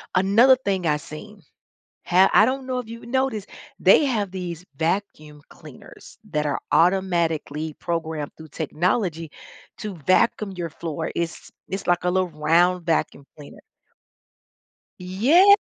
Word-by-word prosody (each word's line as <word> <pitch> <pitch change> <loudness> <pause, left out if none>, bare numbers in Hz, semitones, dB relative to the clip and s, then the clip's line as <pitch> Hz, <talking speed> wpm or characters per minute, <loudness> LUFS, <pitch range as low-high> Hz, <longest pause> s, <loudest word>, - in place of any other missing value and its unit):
Another 215 +8 +5
thing 195 -8 -2
I 150 - +2
seen, 155 +1 -11 0.6
ha 185 +2 +4
I - - +7
don't 260 +2 -2
know 255 -1 -2
if 225 -3 -8
you've 230 0 -9
noticed, 250 -5 -1 0.3
they - - +5
have 215 -7 -1
these 180 -2 -6
vacuum 155 -2 -3
cleaners - - -15
that 150 0 -1
are 145 - -1
automatically 165 -4 +1
programmed 160 -3 -4
through 160 -1 -13
technology 165 - -2 0.5
to 210 -4 -6
vacuum 195 - +1
your 175 -3 -5
floor. 160 0 -5
It's 170 0 -4 0.2
it's 195 +1 -5
like 175 0 +2
a 180 - +1
little 185 0 +1
round 170 +3 +2
vacuum 160 -4 -1
cleaner. 145 -1 -13 1.4
Yes! 280 - +5
180 Hz, 135 wpm, -23 LUFS, 160-205 Hz, 1.4 s, I